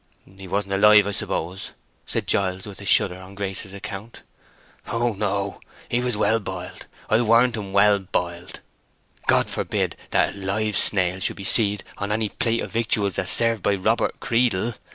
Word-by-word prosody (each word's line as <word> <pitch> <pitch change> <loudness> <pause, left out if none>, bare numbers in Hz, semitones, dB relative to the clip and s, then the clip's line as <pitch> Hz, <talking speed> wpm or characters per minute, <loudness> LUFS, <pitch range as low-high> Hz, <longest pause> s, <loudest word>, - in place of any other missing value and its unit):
"He 95 -1 -10
wasn't 100 +1 -2
alive, 105 +1 +6
I 100 - -2
suppose?" 95 -1 -3 0.3
said - - -2
Giles, 95 -1 0
with 100 -1 -10
a - - -9
shudder 90 -1 +4
on 95 +1 -12
Grace's 100 0 -3
account. 100 +3 -8 0.6
"Oh 115 0 0
no. 100 -1 -2 0.3
He 120 - +1
was 125 -3 -1
well 110 +2 +2
boiled. 100 - -8 0.2
I 110 +2 +3
warrant 120 +1 +4
him 100 -3 -6
well 100 +1 +4
boiled. 90 -2 -4 0.7
God - - +4
forbid - - -2
that - - +2
a - - -11
live 105 +2 -1
snail 95 -2 +2
should 95 - -1
be 100 - -7
seed 105 0 +3 0.2
on 100 +1 -3
any 110 0 0
plate 115 -2 -1
of - - -6
victuals 105 -4 0
that's 95 - 0
served 115 -2 +3
by 100 - +1
Robert 110 +5 0
Creedle.... 115 -2 +1
100 Hz, 175 wpm, -23 LUFS, 95-110 Hz, 0.7 s, alive